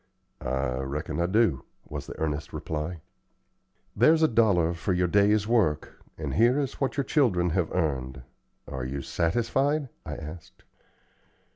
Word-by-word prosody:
"I 65 Hz, 0 st, -1 dB
reckon 70 Hz, +5 st, -3 dB
I 85 Hz, -, +2 dB
do," 100 Hz, -, +2 dB, 0.2 s
was 70 Hz, -2 st, -6 dB
the -, -, -8 dB
earnest 75 Hz, -2 st, -2 dB
reply. 80 Hz, +2 st, -4 dB, 0.9 s
"There's 160 Hz, +1 st, +5 dB
a -, -, +7 dB
dollar 100 Hz, -, +3 dB
for 85 Hz, +3 st, -2 dB
your 90 Hz, 0 st, +2 dB
day's 105 Hz, +3 st, +3 dB
work, 100 Hz, -11 st, +1 dB, 0.2 s
and 75 Hz, -4 st, -4 dB
here 120 Hz, -, +4 dB
is 140 Hz, -1 st, -3 dB
what 135 Hz, +1 st, 0 dB
your 140 Hz, -, +2 dB
children 95 Hz, -, +2 dB
have 85 Hz, 0 st, 0 dB
earned. 65 Hz, -7 st, -2 dB, 0.4 s
Are 65 Hz, -1 st, -5 dB
you 70 Hz, +2 st, -4 dB
satisfied?" 125 Hz, -, 0 dB
I 75 Hz, -2 st, -5 dB
asked. 80 Hz, +1 st, -10 dB
85 Hz, 145 wpm, -27 LUFS, 75-115 Hz, 0.9 s, a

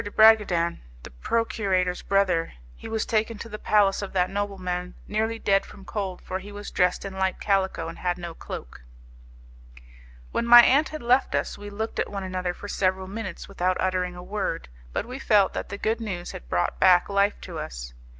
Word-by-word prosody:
de 205 Hz, -, -5 dB
Bragadin, 205 Hz, -6 st, +4 dB, 0.2 s
the -, -, -10 dB
procurator's 185 Hz, -, 0 dB
brother. 190 Hz, -4 st, +1 dB, 0.2 s
He -, -, -10 dB
was 220 Hz, -1 st, -1 dB
taken 220 Hz, 0 st, 0 dB
to 230 Hz, -, -7 dB
the 210 Hz, 0 st, -7 dB
palace 205 Hz, -2 st, +3 dB
of 200 Hz, -, -6 dB
that 180 Hz, -1 st, +1 dB
nobleman 185 Hz, -3 st, -3 dB
nearly 220 Hz, +2 st, -1 dB
dead 195 Hz, -3 st, +2 dB
from 195 Hz, -, -13 dB
cold, 190 Hz, -4 st, -4 dB
for 185 Hz, -, -4 dB
he 200 Hz, +2 st, -10 dB
was 205 Hz, 0 st, -8 dB
dressed 180 Hz, +2 st, +1 dB
in 195 Hz, -, -5 dB
light 190 Hz, -1 st, 0 dB
calico, 190 Hz, -4 st, 0 dB
and 165 Hz, -, -8 dB
had 180 Hz, -1 st, -1 dB
no 170 Hz, -1 st, -6 dB
cloak.' -, -, -8 dB, 1.5 s
"When 235 Hz, -, -1 dB
my 240 Hz, 0 st, +11 dB
aunt 285 Hz, +6 st, +4 dB
had 310 Hz, -4 st, -7 dB
left 250 Hz, +3 st, +3 dB
us, -, -, -1 dB
we 205 Hz, 0 st, -9 dB
looked 220 Hz, +2 st, -4 dB
at -, -, 0 dB
one 200 Hz, -1 st, -4 dB
another 185 Hz, -1 st, -3 dB
for 205 Hz, -, -9 dB
several 190 Hz, -1 st, 0 dB
minutes 195 Hz, -2 st, -6 dB
without 185 Hz, +1 st, 0 dB
uttering 180 Hz, -1 st, 0 dB
a 180 Hz, -, -9 dB
word, 195 Hz, -, -3 dB, 0.2 s
but -, -, -2 dB
we 255 Hz, +3 st, -7 dB
felt 205 Hz, -6 st, +3 dB
that -, -, -4 dB
the 200 Hz, -, -5 dB
good 225 Hz, +3 st, -1 dB
news 180 Hz, -5 st, -4 dB
had -, -, -10 dB
brought 85 Hz, +4 st, 0 dB
back 180 Hz, -2 st, +6 dB
life 200 Hz, 0 st, +1 dB
to -, -, -7 dB
us. -, -, -7 dB
195 Hz, 200 wpm, -25 LUFS, 180-215 Hz, 1.5 s, my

